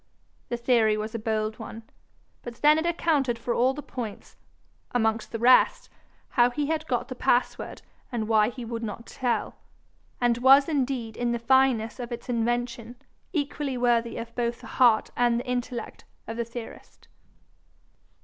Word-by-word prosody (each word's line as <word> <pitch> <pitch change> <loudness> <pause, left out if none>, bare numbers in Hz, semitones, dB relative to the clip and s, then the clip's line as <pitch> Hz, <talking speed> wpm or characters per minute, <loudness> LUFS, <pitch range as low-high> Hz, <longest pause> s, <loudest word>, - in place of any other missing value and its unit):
The 240 - -2
theory 235 -3 +3
was 215 +1 -4
a 230 - -3
bold 215 0 -2
one, 225 0 -8 0.6
but 240 -1 -8
then 300 +5 +4
it 330 - -1
accounted 300 -8 +1
for 235 +1 -2
all 255 +3 +2
the 295 - -7
points 225 -5 -7 0.6
amongst 225 -2 0
the 230 - -3
rest, 255 - +4 0.4
how 240 -1 +4
he 290 +4 -2
had 315 +1 -2
got 245 -4 -1
the 265 - -5
password 250 0 0 0.3
and 225 -3 -2
why 220 -1 +4
he 245 -1 -8
would 230 0 -4
not 230 +1 -6
tell 250 -2 -2 0.6
and 240 -1 +2
was 270 +3 +7
indeed 260 -7 -1
in 240 0 -1
the - - 0
fineness 235 -2 +2
of 245 0 -6
its 235 +1 -7
invention 240 0 -2 0.4
equally 285 -4 -2
worthy 235 -2 +1
of 230 0 -7
both 235 -1 -2
the - - -11 0.2
heart 235 -3 +5
and 240 -1 +2
the 245 - -6
intellect 250 -1 -4 0.2
of 225 - -6
the 235 0 -2
theorist. 235 0 -10
240 Hz, 165 wpm, -26 LUFS, 230-255 Hz, 0.6 s, was